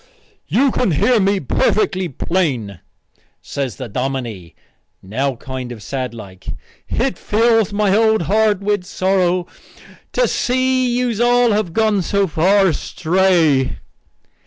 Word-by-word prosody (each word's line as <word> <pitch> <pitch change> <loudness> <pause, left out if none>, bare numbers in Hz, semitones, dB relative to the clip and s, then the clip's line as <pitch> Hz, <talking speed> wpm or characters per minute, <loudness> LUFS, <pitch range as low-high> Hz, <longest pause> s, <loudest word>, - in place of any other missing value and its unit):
"You 270 +1 +2
can 245 - 0
hear 235 - +3
me 200 0 +2
perfectly 185 - 0
plain," 130 - -2 0.6
says 135 -4 -4
the 130 - -7
dominie, 115 -7 -4 0.5
now 130 +8 -2
kind 130 0 -7
of 110 -4 -9
sad 130 -2 -4
like. 95 -4 -12 0.4
"It 260 +2 -1
fills 225 -1 +2
my 205 -1 +1
old 220 -3 +3
heart 210 +2 +2
with 205 -2 0
sorrow 185 -1 0 0.7
to - - +2
see 255 0 +1
that 240 - -1
yous 225 -3 -3
all 240 0 +3
have 205 -4 0
gone 215 -2 +2
so 200 +3 +1
far 190 +4 +3
astray." 165 -4 +1
190 Hz, 130 wpm, -18 LUFS, 135-220 Hz, 0.7 s, hear